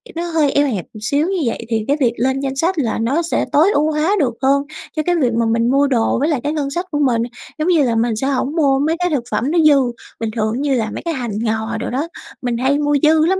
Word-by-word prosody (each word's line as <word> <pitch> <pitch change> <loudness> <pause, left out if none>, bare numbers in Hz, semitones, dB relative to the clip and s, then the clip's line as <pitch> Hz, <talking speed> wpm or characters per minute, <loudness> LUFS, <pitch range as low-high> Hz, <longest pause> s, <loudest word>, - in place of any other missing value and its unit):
nó 335 - -2
hơi 320 -4 +1
eo 285 0 +2
hẹp 210 -9 -3
một 215 - -10
xíu 285 +8 0
như 385 - -1
vậy 230 0 -3
thì 220 -2 -1
cái 285 - +2
việc 240 -5 +2
lên 265 +3 0
danh 270 -1 -3
sách 335 +6 0
là 230 -6 -1
nó 260 +9 +1
sẽ 335 - -1
tối 325 +7 +4
ưu 305 +2 +2
hóa 310 +6 +1
được 260 -7 +1
hơn 275 +1 +3 0.3
cho 310 - 0
cái 355 - +2
việc 255 -8 +1
mà 230 0 +1
mình 230 +1 +1
mua 280 +1 +3
đồ 235 -4 +1
với 290 +4 +1
lại 290 -6 0
cái 295 - -1
ngân 290 -3 -2
sách 345 +6 -3
của 295 - -1
mình. 250 -5 +2 0.4
Giống 310 - 0
như 335 -5 +4
là 235 -3 +1
mình 225 0 +1
sẽ 265 +5 -2
hổng 275 +2 -1
mua 275 -5 +3
mấy 310 +3 +1
cái 355 0 +1
thực 285 -7 -1
phẩm 225 +7 0
nó 340 - +2
dư, 305 -2 +6 0.4
bình 225 - -2
thường 220 +3 -1
như 285 -1 +1
là 220 -3 -1
mấy - - -5
cái 335 - -1
hành 245 -6 -4
ngò 220 0 -1
đồ 225 - -4
đó 275 +6 -2 0.3
mình 245 -2 -1
hay 265 +4 +1
mua 290 0 +1
dư 315 0 +5
lắm, 380 +3 +1
275 Hz, 285 wpm, -18 LUFS, 235-310 Hz, 0.4 s, dư